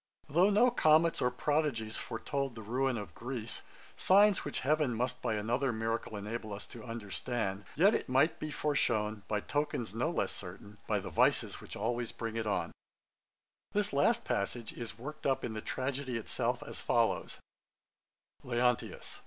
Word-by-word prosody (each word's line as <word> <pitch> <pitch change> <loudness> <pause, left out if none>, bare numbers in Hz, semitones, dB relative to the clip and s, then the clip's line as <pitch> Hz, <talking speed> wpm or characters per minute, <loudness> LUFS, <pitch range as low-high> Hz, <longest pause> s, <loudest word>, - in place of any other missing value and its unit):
'Though 170 +7 +4
no 225 +5 +5
comets 160 -5 +4
or 125 - +4
prodigies 125 -4 0
foretold 135 +3 -3
the 110 - -8
ruin 125 +3 0
of 100 -6 -6
Greece, 120 0 -5 0.3
signs 200 +1 +5
which 145 - -3
heaven 150 -3 +2
must 125 +2 -1
by 110 - 0
another 120 +5 +1
miracle 115 -1 -2
enable 105 +1 -4
us 105 - -7
to 115 - -10
understand, 105 -2 -3
yet 190 -1 +4
might 135 +6 +5
it - - -23
be 155 - -3
foreshewn, 115 -9 +1
by 105 - 0
tokens 145 -8 -1
no 125 +8 0
less 175 - 0
certain, 100 +3 -9
by 105 - +2
the 95 -2 -5
vices 80 - +2
which - - -8
always 120 +2 -1
bring 115 -1 -5
it 115 -1 -1
on_.' 105 - 0 1.0
This 205 -3 +1
last 230 +12 +3
passage 110 +3 -2
is 115 -2 -7
worked 150 +6 -5
up 135 -1 +1
in 115 - -4
the 110 - -4
tragedy 130 0 -2
itself, 115 - -1
as - - -7
follows: - - +1 1.1
LEONTIUS. 125 0 0
120 Hz, 160 wpm, -33 LUFS, 110-145 Hz, 1.1 s, no